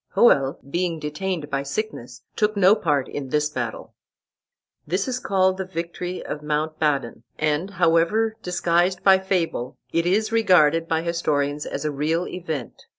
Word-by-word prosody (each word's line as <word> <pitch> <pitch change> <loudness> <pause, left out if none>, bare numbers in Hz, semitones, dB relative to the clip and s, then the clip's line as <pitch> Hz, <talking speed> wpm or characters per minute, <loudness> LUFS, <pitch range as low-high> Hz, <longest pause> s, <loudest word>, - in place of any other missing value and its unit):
Hoel, 135 - +4
being 170 +2 -1
detained 155 +1 -4
by 135 0 0
sickness, 140 - -5
took 210 -1 +1
no 195 0 +6
part 150 -10 0
in 140 -2 -6
this 150 +2 +1
battle. - - -5 0.9
This 185 - -1
is 255 -1 -2
called 190 -4 +2
the 190 - -2
victory 175 +1 -5
of 150 - -5
Mount 150 +1 -2
Badon, 140 -7 0 0.2
and, 155 +4 0
however 185 +5 +2
disguised 175 0 +1
by 190 -1 +6
fable, 175 -9 -2 0.2
it 165 +1 +1
is 215 +4 +1
regarded 165 -8 +4
by 160 0 0
historians 150 -4 -1
as - - -4
a 150 - 0
real 155 +5 -1
event. 160 -8 -6
165 Hz, 150 wpm, -23 LUFS, 150-190 Hz, 0.9 s, no